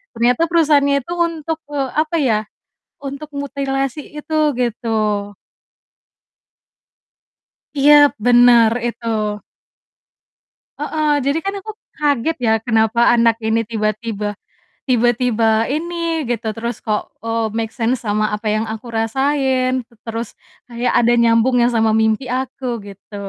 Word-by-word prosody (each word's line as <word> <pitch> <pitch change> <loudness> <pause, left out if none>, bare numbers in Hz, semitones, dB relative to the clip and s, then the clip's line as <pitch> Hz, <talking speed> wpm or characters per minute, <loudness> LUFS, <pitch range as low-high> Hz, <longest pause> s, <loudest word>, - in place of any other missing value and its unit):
ternyata 240 +7 +2
perusahaan 310 -4 +3
itu 280 +2 -1
untuk, 330 -2 -1 0.2
eee, 275 -2 -1
apa 310 +2 +1
ya, 225 -6 +2 0.6
untuk 280 +2 -6
mutilasi 275 0 -2
itu 300 +1 -4 0.2
gitu. 215 -3 -1 2.5
Iya, 285 +2 +6 0.3
bener 240 -2 +6 0.2
itu. 235 0 -6 1.7
Heeh. 305 0 -1
Jadi 280 +3 +1
kan 395 +2 -3
aku 435 +3 -7 0.3
kaget 295 +1 0
ya, 230 -3 +2
kenapa 225 0 +2
anak 230 -1 +4
ini 225 +1 0
tiba-tiba 215 -1 -3 0.5
tiba-tiba 235 -2 +2
ini 335 +1 -2
gitu, 230 -2 -2
terus 235 0 -5
kok, 210 -1 -3
eee, 230 0 -1
make 225 -1 -2
sense 235 +1 -1
sama 215 -1 0
apa 210 +1 -3
yang 215 +1 0
aku 225 +2 -7
rasain, 255 +2 0
tu 235 - -25
terus 230 0 -5 0.3
kayak 240 0 -2
ada 240 0 +3
nyambung 235 +1 +3
yang 240 - +3
sama 225 -2 +2
mimpi 220 +3 +1
aku 255 -1 -3
gitu. 200 +1 -13
240 Hz, 120 wpm, -18 LUFS, 225-280 Hz, 2.5 s, Iya